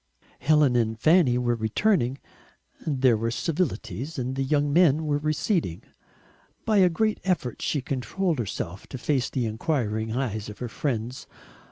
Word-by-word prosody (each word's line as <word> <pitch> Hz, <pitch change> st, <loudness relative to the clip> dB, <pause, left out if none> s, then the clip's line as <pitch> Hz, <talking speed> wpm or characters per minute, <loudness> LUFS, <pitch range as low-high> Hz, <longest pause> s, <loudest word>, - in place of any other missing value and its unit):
Helen 145 Hz, -2 st, +4 dB
and 110 Hz, -2 st, +1 dB
Fanny 155 Hz, -4 st, +4 dB
were 120 Hz, -1 st, +1 dB
returning, 120 Hz, -, +1 dB, 0.7 s
there 130 Hz, -5 st, +3 dB
were 115 Hz, +1 st, -1 dB
civilities, 160 Hz, 0 st, -2 dB
and 130 Hz, +1 st, -2 dB
the 135 Hz, -, -1 dB
young 145 Hz, +1 st, +1 dB
men 160 Hz, -2 st, +4 dB
were 145 Hz, -1 st, +1 dB
receding. 155 Hz, -, -1 dB, 0.8 s
By 215 Hz, -2 st, +2 dB
a 185 Hz, -2 st, +6 dB
great 215 Hz, +5 st, 0 dB
effort 175 Hz, -, -1 dB
she 145 Hz, -4 st, -1 dB
controlled 140 Hz, -, -1 dB
herself 95 Hz, -3 st, -4 dB
to -, -, -7 dB
face 130 Hz, 0 st, 0 dB
the 125 Hz, -3 st, -1 dB
enquiring 110 Hz, -2 st, -1 dB
eyes 110 Hz, -6 st, -2 dB
of 105 Hz, -, -9 dB
her 125 Hz, -, -5 dB
friends. 120 Hz, 0 st, -3 dB
135 Hz, 150 wpm, -26 LUFS, 115-155 Hz, 0.8 s, a